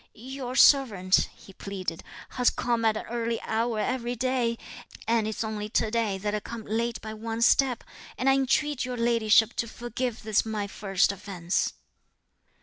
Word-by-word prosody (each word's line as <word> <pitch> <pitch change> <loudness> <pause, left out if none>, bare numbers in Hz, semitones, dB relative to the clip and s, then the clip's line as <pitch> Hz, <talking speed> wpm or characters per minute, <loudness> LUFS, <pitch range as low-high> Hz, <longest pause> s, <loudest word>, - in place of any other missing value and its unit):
"Your 255 +2 -6
servant," 210 -11 +5
he 195 - -15
pleaded, 185 -4 -5 0.3
"has 250 -1 +2
come 235 -2 -1
at 220 -1 +3
an - - -6
early 230 0 -2
hour 225 +1 -1
every 245 +2 -1
day; 245 -1 0 0.5
and 225 -1 +2
it's 220 +1 -3
only 215 -1 -4
to 215 0 0
day 220 -4 0
that 205 +2 -3
I 210 - 0
come 225 +1 -8
late 230 +2 -1
by 220 -1 -6
one 225 +1 -3
step; 255 0 +3 0.3
and 255 - -1
I 270 - +6
entreat 270 +1 +1
your 250 -1 -4
ladyship 230 -1 +4
to 230 - -1
forgive 240 0 -4
this 215 -1 +2
my 215 -2 -3
first 195 -1 +1
offence." 185 -3 -2
230 Hz, 165 wpm, -27 LUFS, 210-245 Hz, 0.5 s, I